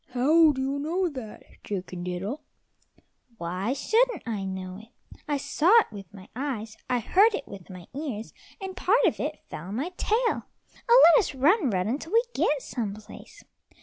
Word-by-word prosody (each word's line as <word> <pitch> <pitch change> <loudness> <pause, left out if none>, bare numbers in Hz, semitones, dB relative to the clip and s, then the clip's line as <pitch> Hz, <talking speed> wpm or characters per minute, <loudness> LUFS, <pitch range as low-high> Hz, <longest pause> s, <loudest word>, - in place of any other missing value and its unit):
"How 305 +6 +5
do 265 - -5
you 275 +1 -2
know 345 +5 0
that, 255 -8 -9 0.2
Chicken 185 -3 -5
diddle?" 190 +11 -4 1.0
"Why 185 +7 -2
shouldn't 450 - +1
I 210 -4 -3
know 190 -1 -5
it? 220 - -15 0.4
I 290 -1 0
saw 285 +4 0
it - - -9
with 195 -4 -10
my 195 -1 -13
eyes, 230 -5 -4
I 250 - +2
heard 400 - +4
it 280 - -6
with 195 -3 -11
my 180 -2 -10
ears, 260 -7 -5 0.3
and 380 -2 -6
part 390 +5 +3
of - - +1
it - - -3
fell 165 - -7
on 200 - -5
my 280 +9 -2
tail. 460 +2 0 0.4
Oh, - - +8
let - - +6
us 365 - -2
run, 300 - +3
run 185 -2 0
until 295 - -4
we 460 +1 +5
get 290 -3 +1
some 210 -5 -4
place." 215 0 -13
260 Hz, 180 wpm, -26 LUFS, 200-325 Hz, 1.0 s, Oh